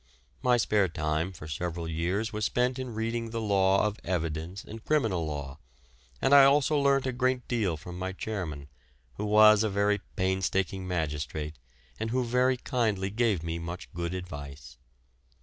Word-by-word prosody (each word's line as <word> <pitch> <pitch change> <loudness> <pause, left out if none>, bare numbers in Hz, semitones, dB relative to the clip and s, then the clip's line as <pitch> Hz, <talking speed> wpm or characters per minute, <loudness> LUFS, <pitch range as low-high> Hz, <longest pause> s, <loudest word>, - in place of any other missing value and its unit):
My 125 -1 +4
spare 105 -4 +2
time 80 +1 -1
for 75 -4 -10
several 85 +2 -4
years 90 +8 -1
was 105 -1 -1
spent 125 +3 +1
in 125 -3 -5
reading 115 +1 -2
the 115 0 -3
law 100 -2 +3
of 105 0 -2
evidence 85 +1 -3
and 110 +1 -10
criminal 110 - +1
law, 70 -1 -5 0.6
and 135 - +2
I 140 -1 +10
also 140 +2 +4
learnt 140 -2 +3
a 130 - 0
great 130 0 0
deal 105 -9 0
from 90 +3 -9
my 95 0 -2
chairman, 90 -8 -5 0.5
who 105 - -2
was 105 0 +7
a 110 - +1
very 100 +1 +1 0.2
painstaking 95 0 0
magistrate, 75 -3 -3 0.4
and 110 - -2
who 125 +2 +1
very 125 +2 +2
kindly 110 -7 -1
gave 110 -6 +1
me 85 0 -3
much 85 -6 -7
good 85 +1 -3
advice. 70 -8 -8
95 Hz, 165 wpm, -29 LUFS, 85-115 Hz, 0.6 s, I